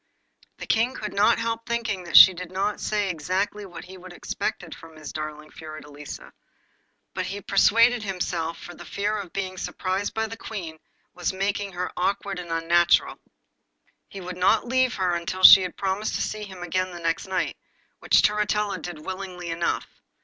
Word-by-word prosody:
The -, -, -7 dB
King 240 Hz, +3 st, +1 dB
could 210 Hz, -, -5 dB
not 210 Hz, +4 st, +4 dB
help 230 Hz, 0 st, -2 dB
thinking 225 Hz, -6 st, -2 dB
that 170 Hz, -, +4 dB
she 190 Hz, -, +11 dB
did 180 Hz, 0 st, -8 dB
not 200 Hz, +3 st, -2 dB
say 210 Hz, -2 st, 0 dB
exactly 195 Hz, +5 st, -2 dB
what 175 Hz, -1 st, -10 dB
he 185 Hz, +1 st, -12 dB
would 185 Hz, 0 st, -11 dB
have 175 Hz, -, -12 dB
expected 180 Hz, -6 st, -4 dB
from 165 Hz, -1 st, -13 dB
his 155 Hz, -1 st, -9 dB
darling 155 Hz, 0 st, -6 dB
Fiordelisa, 150 Hz, -2 st, -10 dB, 0.8 s
but -, -, -3 dB
he 200 Hz, +1 st, -5 dB
persuaded 230 Hz, +5 st, +4 dB
himself 175 Hz, -4 st, -3 dB
that 175 Hz, -, -11 dB
the -, -, -8 dB
fear 205 Hz, +2 st, -2 dB
of 200 Hz, -5 st, -6 dB
being 185 Hz, -1 st, -4 dB
surprised 190 Hz, +2 st, -3 dB
by 220 Hz, 0 st, 0 dB
the 225 Hz, +1 st, -7 dB
Queen 175 Hz, -8 st, -7 dB, 0.3 s
was 175 Hz, -, -2 dB
making 200 Hz, +1 st, -2 dB
her 180 Hz, +1 st, -3 dB
awkward 195 Hz, +1 st, -1 dB
and 175 Hz, -1 st, -8 dB
unnatural. 170 Hz, +1 st, +3 dB, 0.9 s
He 195 Hz, -, -8 dB
would 180 Hz, 0 st, -7 dB
not 215 Hz, +6 st, +3 dB
leave 255 Hz, 0 st, +2 dB
her 185 Hz, -3 st, 0 dB
until 175 Hz, +2 st, -3 dB
she 190 Hz, +1 st, +11 dB
had 180 Hz, -2 st, -5 dB
promised 195 Hz, +2 st, -1 dB
to -, -, -1 dB
see 215 Hz, -1 st, -4 dB
him 190 Hz, -3 st, -9 dB
again 185 Hz, +2 st, -1 dB
the 175 Hz, -1 st, -9 dB
next 165 Hz, +2 st, -1 dB
night, 190 Hz, -, -1 dB, 0.4 s
which -, -, +4 dB
Turritella 210 Hz, 0 st, +1 dB
did 155 Hz, -4 st, -8 dB
willingly 185 Hz, -2 st, -6 dB
enough. 165 Hz, +1 st, -1 dB
185 Hz, 180 wpm, -25 LUFS, 175-205 Hz, 0.9 s, she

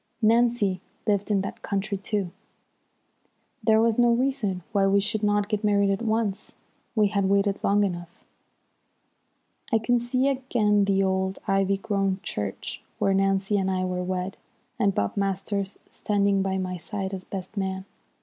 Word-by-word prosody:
Nancy 225 Hz, -4 st, +3 dB, 0.2 s
lived 205 Hz, -1 st, +1 dB
in 200 Hz, -2 st, +2 dB
that 195 Hz, -, -6 dB
country, 200 Hz, +1 st, -2 dB
too. 195 Hz, -2 st, -2 dB, 1.3 s
There 220 Hz, -1 st, +5 dB
was 230 Hz, 0 st, +2 dB
no 240 Hz, 0 st, +5 dB
reason 235 Hz, -7 st, 0 dB
why 200 Hz, -3 st, +3 dB
we 200 Hz, +1 st, +4 dB
should 210 Hz, +2 st, -1 dB
not 205 Hz, -1 st, +2 dB
get 210 Hz, 0 st, -2 dB
married 200 Hz, -1 st, +3 dB
at 195 Hz, -, -1 dB
once. 220 Hz, -3 st, -1 dB, 0.4 s
We 210 Hz, -2 st, +4 dB
had 200 Hz, -1 st, +1 dB
waited 200 Hz, 0 st, +2 dB
long 205 Hz, +1 st, +3 dB
enough. 175 Hz, -3 st, -4 dB, 1.5 s
I 225 Hz, -, +5 dB
can 240 Hz, +2 st, +2 dB
see 255 Hz, +3 st, 0 dB
again 235 Hz, -7 st, +2 dB
the 195 Hz, 0 st, +2 dB
old, 190 Hz, 0 st, 0 dB
ivy 195 Hz, 0 st, +2 dB
grown 195 Hz, -1 st, -1 dB
church 100 Hz, -2 st, -4 dB, 0.2 s
where 195 Hz, -, +2 dB
Nancy 195 Hz, +1 st, +2 dB
and 190 Hz, 0 st, 0 dB
I 185 Hz, -1 st, 0 dB
were 180 Hz, 0 st, -2 dB
wed, 185 Hz, +1 st, -3 dB, 0.4 s
and 200 Hz, -2 st, +2 dB
Bob 100 Hz, -, 0 dB
Masters 195 Hz, 0 st, -2 dB
standing 200 Hz, -1 st, +1 dB
by 190 Hz, 0 st, 0 dB
my 185 Hz, -1 st, -3 dB
side 195 Hz, +2 st, -4 dB
as 185 Hz, -1 st, -5 dB
best 190 Hz, +1 st, -7 dB
man. 190 Hz, -1 st, -2 dB
200 Hz, 160 wpm, -26 LUFS, 190-215 Hz, 1.5 s, There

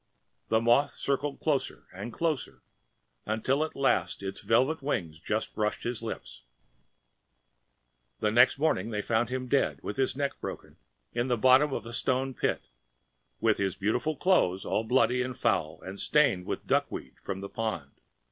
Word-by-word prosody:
‚ÄĚ -, -, -47 dB
And -, -, -44 dB
the 110 Hz, -, +3 dB
moth 120 Hz, +5 st, +4 dB
circled 140 Hz, 0 st, -1 dB
closer 150 Hz, -4 st, -1 dB
and 100 Hz, +6 st, -6 dB
closer 140 Hz, -, -2 dB, 0.6 s
until 130 Hz, +7 st, +1 dB
at 155 Hz, -, -5 dB
last 135 Hz, -6 st, +1 dB
its 95 Hz, 0 st, -4 dB
velvet 130 Hz, +8 st, +2 dB
wings 85 Hz, -, -2 dB
just 110 Hz, +6 st, -2 dB
brushed 105 Hz, -1 st, -1 dB
his 120 Hz, -1 st, -2 dB
lips..... -, -, -6 dB, 1.8 s
And 105 Hz, -, +1 dB
next 120 Hz, +3 st, +6 dB
morning 135 Hz, -9 st, +1 dB
they 105 Hz, -2 st, -2 dB
found 115 Hz, +1 st, +1 dB
him 130 Hz, 0 st, -3 dB
dead 135 Hz, +2 st, +1 dB
with -, -, -4 dB
his 130 Hz, -1 st, +1 dB
neck 140 Hz, 0 st, -2 dB
broken -, -, -7 dB, 0.4 s
in 120 Hz, +1 st, 0 dB
the 120 Hz, -2 st, +1 dB
bottom 130 Hz, +5 st, +5 dB
of -, -, -3 dB
the 120 Hz, +1 st, -8 dB
stone 130 Hz, +1 st, 0 dB
pit, -, -, -1 dB, 0.8 s
with 110 Hz, -1 st, +2 dB
his 95 Hz, -2 st, 0 dB
beautiful 115 Hz, +10 st, 0 dB
clothes 95 Hz, -, +2 dB
a -, -, -5 dB
little 110 Hz, -, 0 dB
bloody 125 Hz, +1 st, +3 dB
and 125 Hz, -1 st, -3 dB
foul 80 Hz, -10 st, 0 dB
and 95 Hz, +1 st, -7 dB
stained 130 Hz, -12 st, +2 dB
with -, -, -2 dB
the -, -, -26 dB
duckweed 65 Hz, -1 st, -1 dB
from 95 Hz, -1 st, -4 dB
the 100 Hz, -, -6 dB
pond. 95 Hz, -, -4 dB
120 Hz, 175 wpm, -29 LUFS, 100-135 Hz, 1.8 s, next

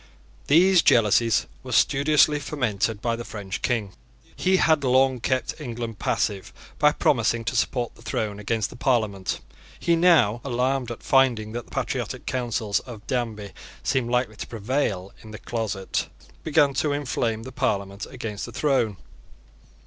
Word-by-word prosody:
These 175 Hz, +4 st, +6 dB
jealousies 115 Hz, -, +4 dB, 0.2 s
were 130 Hz, -, -9 dB
studiously 145 Hz, +3 st, +4 dB
fomented 110 Hz, -7 st, -2 dB
by 115 Hz, -1 st, +1 dB
the 120 Hz, -, -6 dB
French 100 Hz, -4 st, -6 dB
King. 110 Hz, -6 st, -1 dB, 0.4 s
He 185 Hz, +1 st, +2 dB
had 160 Hz, -5 st, +3 dB
long 130 Hz, 0 st, +3 dB
kept 130 Hz, +6 st, -2 dB
England 115 Hz, -5 st, -5 dB
passive 100 Hz, -1 st, -1 dB, 0.3 s
by 150 Hz, 0 st, +5 dB
promising 115 Hz, -3 st, +1 dB
to -, -, -2 dB
support 120 Hz, -2 st, 0 dB
the -, -, -19 dB
throne 105 Hz, -2 st, -3 dB
against 110 Hz, +1 st, -1 dB
the -, -, -10 dB
Parliament. 110 Hz, -7 st, 0 dB, 0.4 s
He 170 Hz, -, +2 dB
now, 165 Hz, -, +4 dB
alarmed 130 Hz, 0 st, 0 dB
at 120 Hz, -, -7 dB
finding 125 Hz, -5 st, +3 dB
that 120 Hz, +1 st, -5 dB
the -, -, -21 dB
patriotic -, -, -3 dB
counsels 115 Hz, -5 st, -1 dB
of 115 Hz, -4 st, -11 dB
Danby 110 Hz, -6 st, -3 dB, 0.3 s
seemed 130 Hz, -3 st, 0 dB
likely 125 Hz, -3 st, 0 dB
to -, -, -6 dB
prevail 105 Hz, -4 st, -2 dB
in 110 Hz, -, -12 dB
the 110 Hz, -, -8 dB
closet, 105 Hz, -5 st, -3 dB, 0.3 s
began 145 Hz, -2 st, +3 dB
to 145 Hz, +1 st, 0 dB
inflame 120 Hz, -6 st, -2 dB
the 130 Hz, -, -8 dB
Parliament 100 Hz, -5 st, -2 dB
against 105 Hz, -3 st, -5 dB
the -, -, -8 dB
throne. 125 Hz, -9 st, +1 dB
120 Hz, 150 wpm, -24 LUFS, 110-135 Hz, 0.4 s, These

